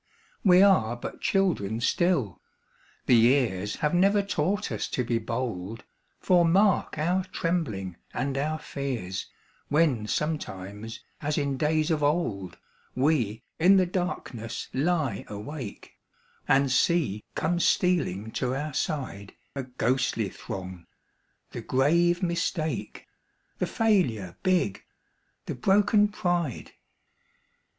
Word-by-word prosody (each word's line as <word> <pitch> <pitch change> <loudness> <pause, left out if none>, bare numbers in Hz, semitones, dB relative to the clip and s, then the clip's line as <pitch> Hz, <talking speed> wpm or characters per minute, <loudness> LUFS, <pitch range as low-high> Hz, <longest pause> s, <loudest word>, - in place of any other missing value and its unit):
We 185 -1 +7
are 120 - +4
but 120 - -8
children 160 - +1
still, 130 - +1 0.6
the - - +4
years 115 -5 +3
Have 150 - -1
never 200 +3 +4
taught 200 +2 -1
us - - -2
to 125 - -1
be 115 -1 0
bold, 115 -3 -4 0.4
For 180 -2 +4
mark 190 +3 +3
our 175 +5 +1
trembling 125 - -2
and 135 0 -2
our 155 +3 -1
fears 125 - -4 0.4
When 145 -8 +2
sometimes, 110 -8 -4 0.2
as 150 0 -1
in 140 -2 0
days 155 +3 +1
of 155 -2 +1
old, 130 - -1 0.4
We 125 -5 +1 0.2
in 185 +4 +6
the 185 - +4
darkness 175 - -4
lie 145 - 0
awake, 105 +2 -7 0.5
And 135 0 +3
see 130 - +2
come 170 +2 0
stealing 140 - +1
to 125 +2 -1
our 150 +2 -3
side 130 - -3 0.2
A 140 - -2
ghostly 125 -4 0
throng 90 -2 -8 0.6
the - - -6
grave 170 +7 +2
Mistake, 170 -2 -2 0.5
The - - 0
Failure 135 - +1
big, 180 - +1 0.6
the - - -3
broken 205 - +3
Pride. 175 - -2
140 Hz, 115 wpm, -27 LUFS, 110-175 Hz, 0.6 s, We